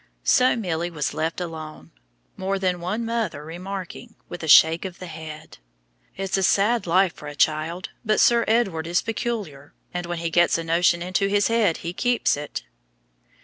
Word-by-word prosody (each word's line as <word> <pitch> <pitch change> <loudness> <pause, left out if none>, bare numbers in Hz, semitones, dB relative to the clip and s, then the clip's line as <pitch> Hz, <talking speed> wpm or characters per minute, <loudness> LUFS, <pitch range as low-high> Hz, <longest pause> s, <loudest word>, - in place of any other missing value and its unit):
So 255 -1 +4
Milly 175 -6 -2
was 155 -4 -3
left 160 +2 -2
alone, 155 - -7 0.4
more 195 +1 -2
than 185 -2 -1
one 210 +7 -2
mother 225 -10 -2
remarking 190 +7 -7
with 175 - -7
a 160 - -5
shake 160 +2 +7
of 185 -2 -6
the 185 - -8
head 155 - -9 0.6
"It's 195 0 -1
a - - 0
sad 200 +3 +2
life 185 +1 +3
for 150 - -11
a 145 - -7
child, 155 +4 0
but 215 -1 +1
Sir 235 -1 +5
Edward 195 -8 +1
is 175 +1 +1
peculiar, 215 - -4 0.2
and 175 -1 -4
when 175 0 -3
he 165 0 -3
gets 175 0 +4
a 165 - -4
notion 170 +1 +2
into 185 +2 0
his 205 +1 +2
head 225 -7 +2
he 170 - -3
keeps 245 +5 +1
to 145 - -2
it." 140 - -6
175 Hz, 185 wpm, -23 LUFS, 160-200 Hz, 0.6 s, shake